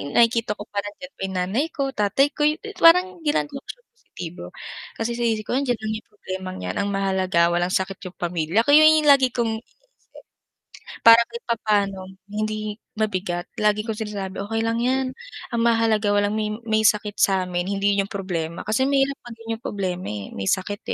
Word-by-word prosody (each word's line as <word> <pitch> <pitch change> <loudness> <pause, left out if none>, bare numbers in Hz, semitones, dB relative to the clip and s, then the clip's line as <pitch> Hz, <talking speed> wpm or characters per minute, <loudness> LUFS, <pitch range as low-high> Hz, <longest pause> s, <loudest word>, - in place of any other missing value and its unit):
nakikita 230 -2 +3
ko 205 - -8
pa 200 - -1
nandiyan 240 +8 -9
pa - - -16
'yung 190 - -6
nanay 195 - 0
ko, 275 -1 -1
tatay 210 +7 +2
ko, 295 0 +2 0.3
parang 360 +2 +5
ginagawa 295 -1 0
ko - - -57
siyang - - -10
positibo, 175 - -9 0.5
kasi 225 +1 -2
sa 240 - 0
isip 215 -1 0
ko - - -4
andiyan 255 -3 0
lang 220 0 -3
yung - - -28
problemang 185 -2 -7
'yan - - -3
ang 200 - 0
mahalaga 190 -3 +2
walang 175 +1 +1
sakit 190 0 -1
yung 180 - -11
pamilya 175 +4 0
ko 285 - +2
ayun 310 0 +7
yung 295 - +7
lagi 265 -2 +5
kong 225 -2 0
iniisip - - -36 1.3
para 230 0 +10
kahit 470 - -4
papaano 200 -4 -1 0.2
hindi 215 0 -3 0.2
mabigat 185 -5 -1 0.2
lagi 210 0 +2
kong 220 -1 -4
sinasabi, 195 -2 -5
"Okey 225 +2 -2
lang 230 +1 0
yan, 260 +2 +1 0.5
ang 235 - 0
mahalaga 225 -2 +2
walang 205 0 +2
may 215 -1 -1 0.2
may 220 -1 +2
sakit 210 -1 +2
samin 185 -2 +1
hindi 200 0 +1
yun 195 - -2
problema." 170 -5 -4
Kasi 220 +6 +1
mahirap 275 0 +2
maging 230 -1 -11
yung - - -21
problema 185 -3 -3
eh, 105 -2 -6
may 95 -1 -3
sakit 205 +2 -1
210 Hz, 185 wpm, -23 LUFS, 190-235 Hz, 1.3 s, para